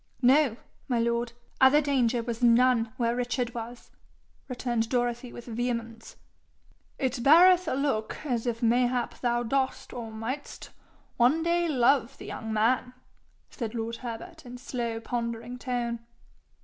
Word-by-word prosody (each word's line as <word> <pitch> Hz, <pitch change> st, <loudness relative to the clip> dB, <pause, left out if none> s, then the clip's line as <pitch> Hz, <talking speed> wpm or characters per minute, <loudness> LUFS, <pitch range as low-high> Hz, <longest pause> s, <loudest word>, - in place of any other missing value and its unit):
'No, 260 Hz, -2 st, +4 dB, 0.3 s
my 245 Hz, -, 0 dB
lord. 235 Hz, 0 st, 0 dB, 0.3 s
Other 265 Hz, +3 st, +7 dB
danger 250 Hz, -5 st, +1 dB
was 235 Hz, 0 st, -4 dB
none 240 Hz, -1 st, +4 dB
where 235 Hz, -2 st, +1 dB
Richard 245 Hz, -1 st, -2 dB
was,' 235 Hz, +1 st, -8 dB, 0.6 s
returned 240 Hz, -3 st, -2 dB
Dorothy 245 Hz, 0 st, -1 dB
with 240 Hz, -, -10 dB
vehemence. 230 Hz, -1 st, -4 dB, 0.8 s
'It 260 Hz, -1 st, -1 dB
beareth 350 Hz, +6 st, +6 dB
a -, -, 0 dB
look 265 Hz, -6 st, -1 dB
as 245 Hz, -4 st, -1 dB
if 230 Hz, 0 st, -2 dB
mayhap 245 Hz, +1 st, +1 dB
thou 240 Hz, -1 st, +1 dB
dost 265 Hz, +2 st, -1 dB
or 235 Hz, -2 st, -6 dB
mightst 235 Hz, +6 st, -6 dB, 0.5 s
one 260 Hz, +7 st, +3 dB
day 345 Hz, 0 st, +1 dB
love 270 Hz, -2 st, +2 dB
the -, -, -10 dB
young 220 Hz, 0 st, -6 dB
man!' 250 Hz, +3 st, +1 dB, 0.6 s
said 230 Hz, -1 st, -5 dB
lord 230 Hz, 0 st, -3 dB
Herbert 255 Hz, +9 st, -8 dB
in 250 Hz, -1 st, -9 dB
slow 240 Hz, -3 st, -4 dB
pondering 235 Hz, +1 st, -4 dB
tone. 240 Hz, -2 st, -2 dB
245 Hz, 135 wpm, -28 LUFS, 230-260 Hz, 0.8 s, Other